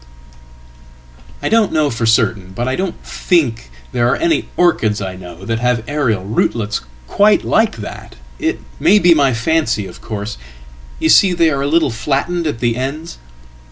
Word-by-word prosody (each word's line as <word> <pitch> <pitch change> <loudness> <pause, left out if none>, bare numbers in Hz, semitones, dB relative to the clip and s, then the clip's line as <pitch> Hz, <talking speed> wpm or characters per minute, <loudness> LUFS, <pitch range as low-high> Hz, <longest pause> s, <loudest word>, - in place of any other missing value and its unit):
""I - - 0
don't 225 -1 +3
know 155 -2 +1
for 115 0 -1
certain, 110 -5 +1
but 120 +5 -3
I 130 - 0
don't 190 -1 -3
think 125 - 0 0.2
there 120 -1 +1
are - - +2
any 335 0 0
orchidsI 105 - +1
know 90 0 -11
that 115 +2 -2
have 125 -2 0
aerial 130 -10 0
rootlets 105 0 -1 0.2
quite 205 - +3
like 220 - +1
that. 105 - -9 0.2
It - - -2 0.2
may 205 - +5
be 175 -4 +5
my 140 -5 +2
fancy, 115 -3 0
ofcourse. 105 +3 -7 0.6
You 160 - 0
see 185 +2 +6
they 165 -2 +3
are 140 -1 -1
a 140 - -1
little 160 -2 +2
flattened 140 +8 -1
at 115 -6 -4
the 120 -1 0
ends."" 150 +6 -5
125 Hz, 160 wpm, -17 LUFS, 110-165 Hz, 0.6 s, see